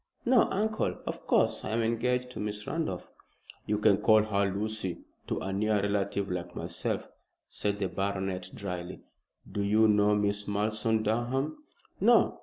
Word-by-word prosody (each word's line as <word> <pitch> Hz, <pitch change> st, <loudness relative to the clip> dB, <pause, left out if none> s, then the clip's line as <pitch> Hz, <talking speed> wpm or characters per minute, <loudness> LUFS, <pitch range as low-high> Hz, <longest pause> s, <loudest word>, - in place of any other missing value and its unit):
"No, 245 Hz, -1 st, +5 dB
uncle. 215 Hz, +3 st, 0 dB
Of -, -, -6 dB
course -, -, +2 dB
I -, -, -4 dB
am 115 Hz, +1 st, +1 dB
engaged 125 Hz, +2 st, 0 dB
to -, -, -7 dB
Miss 105 Hz, 0 st, -3 dB
Randolph." 160 Hz, -, -3 dB, 0.6 s
"You 105 Hz, -, +1 dB
can 105 Hz, -2 st, +4 dB
call 110 Hz, 0 st, +5 dB
her 100 Hz, -2 st, +1 dB
'Lucy' 105 Hz, -2 st, -3 dB, 0.3 s
to -, -, -1 dB
a 95 Hz, +1 st, -3 dB
near 105 Hz, +2 st, +1 dB
relative 100 Hz, -1 st, -1 dB
like 90 Hz, -1 st, -4 dB
myself," -, -, -3 dB, 0.4 s
said 100 Hz, 0 st, -2 dB
the 100 Hz, -2 st, -1 dB
baronet, 95 Hz, 0 st, -2 dB
dryly. 90 Hz, -2 st, -6 dB, 0.5 s
"Do 100 Hz, +1 st, -2 dB
you 105 Hz, +2 st, +4 dB
know 105 Hz, 0 st, +4 dB
Miss 105 Hz, 0 st, 0 dB
Malleson, 110 Hz, +2 st, 0 dB
Durham?" 130 Hz, -, -1 dB, 0.3 s
"No. -, -, +4 dB
105 Hz, 155 wpm, -29 LUFS, 100-110 Hz, 0.6 s, No